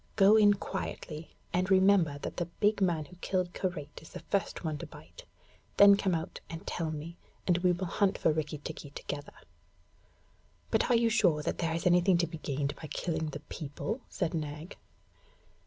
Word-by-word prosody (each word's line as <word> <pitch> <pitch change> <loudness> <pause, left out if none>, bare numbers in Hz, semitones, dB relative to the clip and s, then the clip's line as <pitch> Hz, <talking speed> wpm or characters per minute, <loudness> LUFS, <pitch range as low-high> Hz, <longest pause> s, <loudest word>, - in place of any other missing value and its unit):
Go 200 0 +7
in 205 -2 +6
quietly, 165 -5 -6 0.2
and 185 +1 +1
remember 190 -6 +4
that - - -5
the 175 - -1
big 210 0 +3
man 170 -5 +1
who 175 +5 -15
killed 180 -1 -1
Karait 150 -6 -4
is 160 - -13
the - - -8
first 200 -2 -2
one 155 -3 -2
to - - -6
bite. - - -13 0.5
Then 200 0 +9
come 195 -3 +1
out 160 0 -4
and 165 +4 -7
tell 165 -2 -2
me, 155 +2 -6 0.3
and 175 -1 +3
we 180 0 +3
will 180 +2 -2
hunt 195 +3 +1
for 160 - +2
Rikki 155 0 -2
tikki 145 0 -7
together.' 145 0 -6 1.4
'But - - +2
are 245 - +5
you 230 0 +4
sure 150 -7 +3
that - - -2
there 165 -1 0
is 165 - -3
anything 180 +1 +5
to 170 - +2
be 165 -1 -8
gained 140 -1 -2
by 155 - -8
killing 160 0 -2
the 145 0 -7
people?' 160 - -5
said 175 -2 -2
Nag. 150 +1 -5
170 Hz, 190 wpm, -31 LUFS, 155-190 Hz, 1.4 s, Then